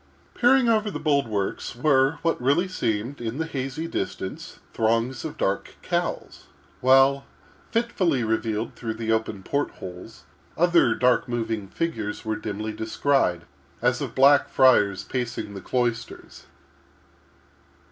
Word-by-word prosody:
Peering 250 +1 +4
over 215 -2 +2
the - - -5
bulwarks 120 -10 -1
were 135 +1 +3
what 165 -6 0
really 145 +9 +2
seemed, 120 - -2
in 115 +2 -4
the 160 - -1
hazy 135 +1 -4
distance, 95 - -5 0.2
throngs 115 +2 0
of 160 - -6
dark 95 0 -2
cowls; - - -3 0.3
while, 135 +2 +5 0.5
fitfully 190 - +1
revealed 110 0 -1
through 110 -2 -5
the 110 0 -2
open 110 -3 -1
port 145 +6 -1
holes, 90 -1 -10 0.3
other 170 -9 +4
dark 125 +1 +2
moving 115 -4 -2
figures 110 - -4
were 110 0 -1
dimly 105 0 -4
descried, 110 -5 0 0.4
as - - +1
of - - -5
Black 140 +2 +5
Friars 105 -8 +4
pacing 120 -4 -4
the 100 - -7
cloisters. 120 -3 -3
125 Hz, 125 wpm, -25 LUFS, 110-145 Hz, 0.5 s, while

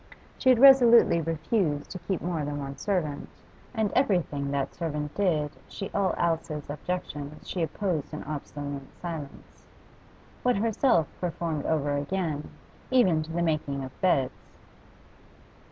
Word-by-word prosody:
She 260 - +3
had 255 - +7
resolutely 240 -8 +7
refused 160 -1 -1
to 185 - -5
keep 190 0 -3
more 170 -3 -1
than 145 0 -3
one 140 -1 -5
servant, 170 -8 -2 0.4
and 220 -4 0
everything 175 - +1
that 140 -1 -1
servant 150 -3 -3
did 160 -7 +1 0.2
she 195 - -6
all 195 -2 +1
Alice's 160 -3 -1
objections 150 -2 -5
she 180 - -3
opposed 165 -2 -2
an 155 - -6
obstinate 145 -2 -6
silence. 160 -5 -8 0.7
What 250 -4 +2
herself 215 - +2
performed 165 -4 -2
over 145 -2 +1
again, 150 0 -2 0.4
even 190 -12 +4
to 155 +1 -7
the 170 +1 0
making 150 -4 -1
of 130 - -6
beds. 140 -8 +1
160 Hz, 135 wpm, -27 LUFS, 145-190 Hz, 0.7 s, had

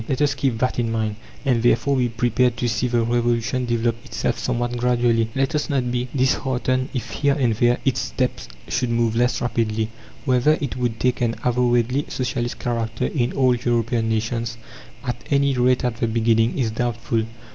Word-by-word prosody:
Let 135 - 0
us 145 -1 +2
keep 135 -3 0
that 125 +1 0
in 115 -1 0
mind, 110 -2 -1 0.3
and 125 -4 +2
therefore 120 +4 +3
be 125 -1 +1
prepared 120 +1 +1
to 120 - 0
see 120 +2 0
the 120 -1 +1
Revolution 120 +1 0
develop 115 0 0
itself - - -2
somewhat 120 0 -1
gradually. 120 -2 +2
Let 135 +3 +1
us 150 +1 -1
not 130 -4 0
be 125 0 -1
disheartened 130 0 +1
if 125 - -4
here 140 -1 +1
and 125 -6 +2
there 120 +2 +3
its 130 -1 +2
steps 125 - -2 0.2
should 125 0 -1
move 115 -1 +1
less 125 +1 +2
rapidly. 110 -2 0 0.4
Whether 130 +3 +3
it 140 -5 -3
would 120 -3 -2
take 125 0 +1
an 115 -1 +1
avowedly 125 +2 +1
socialist 120 -2 -2
character 115 -2 -2
in 120 -4 -1
all 130 -2 +3
European 120 -1 0
nations, 115 +1 -1 0.5
at 125 -3 -4
any 140 -1 +3
rate 125 0 +2
at 120 -2 -1
the 115 - 0
beginning, 115 0 +2
is 120 -5 0
doubtful. 115 -1 -1
120 Hz, 180 wpm, -22 LUFS, 115-125 Hz, 0.5 s, therefore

